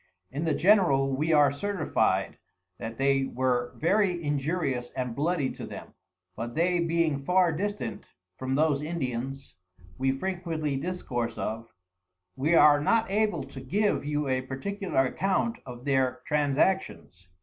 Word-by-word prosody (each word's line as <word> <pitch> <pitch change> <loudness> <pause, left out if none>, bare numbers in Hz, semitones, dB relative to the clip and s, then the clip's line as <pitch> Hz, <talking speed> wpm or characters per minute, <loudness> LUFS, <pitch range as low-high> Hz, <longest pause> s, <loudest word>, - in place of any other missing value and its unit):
In 145 +5 -3
the 155 -3 +1
general 165 -9 +4
we 155 +4 0
are 145 -3 +5
certified, 185 +3 0 0.4
that 115 0 -6
they 135 0 +2
were 125 -2 -1
very 180 0 +1
injurious 145 -3 -1
and 125 -2 -3
bloody 150 -1 0
to - - -9
them; - - -9 0.4
but 120 +2 -5
they 175 +2 +2
being 165 -4 +1
far 180 +2 +3
distant 160 - -4 0.3
from 130 +5 -2
those 150 -1 +2
Indians, 135 -4 -4 0.5
we 135 0 +2
frequently 165 -1 -2
discourse 135 -7 -3
of, 115 +1 -4 0.7
wer 155 +5 +2
are 145 -2 +7
not 225 +6 +2
able 215 +1 +1
to 135 - -10
give 205 +11 0
you 150 0 -1
a 130 -1 +1
particular 135 +4 -1
account 195 - 0
of 125 0 -9
their 130 -2 +1
Transactions. 145 - 0
145 Hz, 140 wpm, -28 LUFS, 130-175 Hz, 0.7 s, are